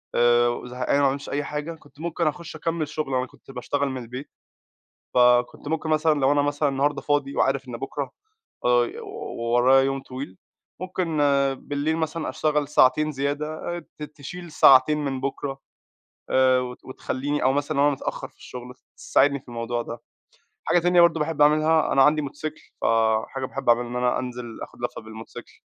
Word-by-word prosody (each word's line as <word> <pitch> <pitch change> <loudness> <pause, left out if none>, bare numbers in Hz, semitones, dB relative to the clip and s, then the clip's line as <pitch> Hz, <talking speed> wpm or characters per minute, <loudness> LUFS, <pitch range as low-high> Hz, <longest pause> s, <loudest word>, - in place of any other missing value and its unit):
آآ 120 0 +3
زهقان 125 +3 0
وما 140 - +4
عملتش 140 +1 -5
أي 145 +1 -1
حاجة، 150 +3 -4
كنت 145 -3 -21
ممكن 170 0 -1
أخش 160 +1 -4
أكمل 165 -1 -2
شغل، 150 -3 -3
أنا 125 0 +1
كنت - - -16
باشتغل 140 +2 -2
من 130 -1 -5
البيت، 125 +5 -8 0.9
فكنت 125 +2 +3
ممكن 160 0 -2
مثلًا 155 -1 +2
لو 135 +1 +4
أنا 145 0 +3
مثلًا 145 +1 0
النهاردة 140 +1 0
فاضي 145 -2 0
وعارف 135 -1 +1
إن 120 - -5
بكرا 135 +2 -4 0.5
آآ 120 -1 +3 0.5
ورايا 120 +3 +4
يوم 135 0 -1
طويل، 130 -8 -8 0.4
ممكن 180 -3 -2 0.4
بالليل 145 +2 -2
مثلًا 160 0 -2
أشتغل 150 -2 0
ساعتين 155 +2 +3
زيادة 140 +2 -2 0.3
آآ 170 - -8
ت - - -8
تشيل 155 +3 -9
ساعتين 140 +1 +6
من 135 -2 -2
بكرا 135 0 -4 0.7
آآ 130 -1 +4
وتخليني 130 +3 -4
أو 130 - +3
مثلًا 145 +1 -1
لو 140 - +4
أنا 145 - +4
متأخر 135 - -4
في - - -30
الشغل، 125 0 -9 0.2
تساعدني 140 0 +2
في - - -28
الموضوع 120 0 -3
ده. 115 0 -7 0.7
حاجة - - +3
تانية 175 +1 +4
برضو 170 -2 +4
باحب 150 -1 0
أعملها، 155 +1 +4
أنا 135 - +5
عندي 150 +2 +4
موتوسيكل، 155 +2 -6 0.2
ف - - -1 0.4
حاجة 135 -1 -5
باحب 135 0 -6
أعملها 120 0 +4
إن 120 - -5
أنا 125 0 +1
أنزل 125 -2 -6
آخد - - -11
لفة - - -3
بالموتوسيكل، 110 0 -10
140 Hz, 175 wpm, -24 LUFS, 125-155 Hz, 0.9 s, ساعتين